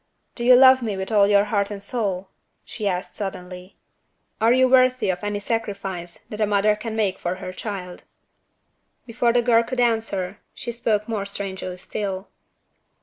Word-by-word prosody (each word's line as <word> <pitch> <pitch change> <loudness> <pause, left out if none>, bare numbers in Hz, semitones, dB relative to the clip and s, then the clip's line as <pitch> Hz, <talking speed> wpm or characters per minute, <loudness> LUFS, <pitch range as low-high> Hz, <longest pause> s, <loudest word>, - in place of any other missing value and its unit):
"Do 235 - -6
you 250 +1 +7
love 260 0 +7
me 215 -4 -3
with 190 +2 -3
all 205 -2 +5
your 200 -1 +5
heart 205 -1 0
and 205 - -5
soul?" 195 -3 -3 0.4
she 210 - -4
asked 180 -1 -3
suddenly. 180 -2 -7 0.6
"Are 225 +1 +5
you 255 +1 +5
worthy 255 -4 +4
of 180 - -6
any 205 0 -2
sacrifice 195 -5 -4
that 210 0 -5
a 210 - +3
mother 205 +1 +3
can 220 +1 -6
make 205 -4 0
for 175 +1 -2
her 185 -1 -7
child?" 185 -3 -7 1.0
Before 235 0 +1
the 240 0 +2
girl 230 -1 +5
could 250 +2 -4
answer, 220 -5 0 0.2
she 235 - -5
spoke 215 -3 -1
more 210 -3 -3
strangely 190 -2 -5
still. 195 0 -5
205 Hz, 170 wpm, -23 LUFS, 190-230 Hz, 1.0 s, you